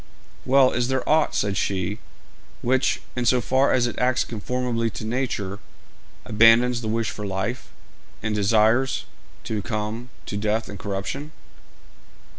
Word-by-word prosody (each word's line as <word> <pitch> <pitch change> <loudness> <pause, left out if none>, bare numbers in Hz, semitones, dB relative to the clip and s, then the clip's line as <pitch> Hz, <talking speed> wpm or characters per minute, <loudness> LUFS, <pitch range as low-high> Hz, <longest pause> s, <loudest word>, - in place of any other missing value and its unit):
'Well, 130 0 +5
is 120 0 0
there 130 0 -1
aught,' 155 0 +3
said 100 -1 0
she, 95 +2 -1 0.6
'which, 130 +2 +1
in 125 -1 -1
so 125 +2 +4
far 130 +3 +2
as 125 -2 +3
it 120 - -3
acts 125 0 +2
conformably 120 +1 -2
to 110 - -7
nature, 110 -5 -2 0.7
abandons 115 +3 +5
the 110 - -4
wish 115 0 -1
for 105 - -7
life, 100 +5 -3 0.5
and 110 0 -1
desires 110 +5 +2 0.4
to 110 -2 -3
come 115 +2 -4 0.2
to 100 - -4
death 110 +2 -1
and 100 - -8
corruption?' 100 - -4
115 Hz, 140 wpm, -24 LUFS, 105-125 Hz, 0.7 s, Well